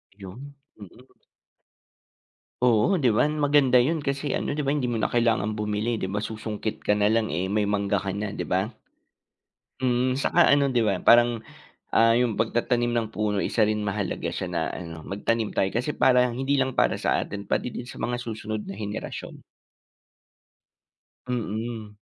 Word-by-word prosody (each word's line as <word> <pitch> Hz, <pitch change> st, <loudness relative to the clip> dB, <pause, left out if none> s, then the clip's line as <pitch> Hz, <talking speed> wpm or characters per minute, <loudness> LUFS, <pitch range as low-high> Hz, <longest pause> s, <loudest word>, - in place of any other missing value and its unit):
'Yon, 105 Hz, +9 st, -10 dB, 0.2 s
mm. 100 Hz, -, -10 dB, 1.8 s
Oo, 125 Hz, -, +4 dB
'di 130 Hz, -8 st, +2 dB
ba? 145 Hz, -, +3 dB
Maganda 145 Hz, -3 st, +3 dB
'yon 150 Hz, +6 st, +2 dB
kasi 140 Hz, 0 st, -2 dB
ano, -, -, -2 dB
'di 150 Hz, -, -1 dB
ba, 140 Hz, -, +1 dB
hindi 135 Hz, -4 st, -1 dB
mo 120 Hz, -, -1 dB
na 110 Hz, -, 0 dB
kailangang 115 Hz, -3 st, +1 dB
bumili, 105 Hz, +2 st, -2 dB
'di 95 Hz, -, -2 dB
ba, 100 Hz, -, -3 dB
susungkit 110 Hz, 0 st, -4 dB
ka 105 Hz, -, +1 dB
nalang, 110 Hz, +2 st, +2 dB
eh, 85 Hz, +4 st, -1 dB
may 105 Hz, -1 st, +1 dB
mangga 100 Hz, -1 st, 0 dB
ka, 100 Hz, -, -4 dB
'di 100 Hz, +1 st, -4 dB
ba? 95 Hz, +2 st, +1 dB, 1.2 s
Mm, 125 Hz, 0 st, +2 dB
saka 135 Hz, -, +3 dB
ano 140 Hz, -1 st, +4 dB
'di 125 Hz, -, +1 dB
ba, 95 Hz, -3 st, 0 dB
parang, 120 Hz, -1 st, +5 dB, 0.5 s
ah, 115 Hz, 0 st, +5 dB
yung 120 Hz, -2 st, +1 dB
pagtatanim 120 Hz, +2 st, 0 dB
ng 115 Hz, -1 st, 0 dB
puno 105 Hz, -1 st, -1 dB
isa 110 Hz, -, 0 dB
rin 105 Hz, 0 st, +1 dB
mahalaga 100 Hz, -2 st, -2 dB
siya -, -, -4 dB
na -, -, -1 dB
ano, 80 Hz, -2 st, -8 dB
magtanim 110 Hz, +2 st, -1 dB
tayo 95 Hz, -, +1 dB
kasi 125 Hz, +8 st, -2 dB
parang 125 Hz, -1 st, +3 dB
hindi 135 Hz, +3 st, 0 dB
lang 130 Hz, -1 st, +1 dB
para -, -, +2 dB
sa -, -, +1 dB
atin 100 Hz, 0 st, -6 dB
pati 125 Hz, -, -1 dB
din 120 Hz, -, -7 dB
sa 125 Hz, -, -10 dB
mga 120 Hz, +2 st, -1 dB
susunod 110 Hz, -3 st, -5 dB
na 95 Hz, -, -6 dB
henerasyon. 105 Hz, +1 st, -6 dB, 1.9 s
Mm. 110 Hz, -2 st, -4 dB
115 Hz, 165 wpm, -25 LUFS, 105-125 Hz, 1.9 s, parang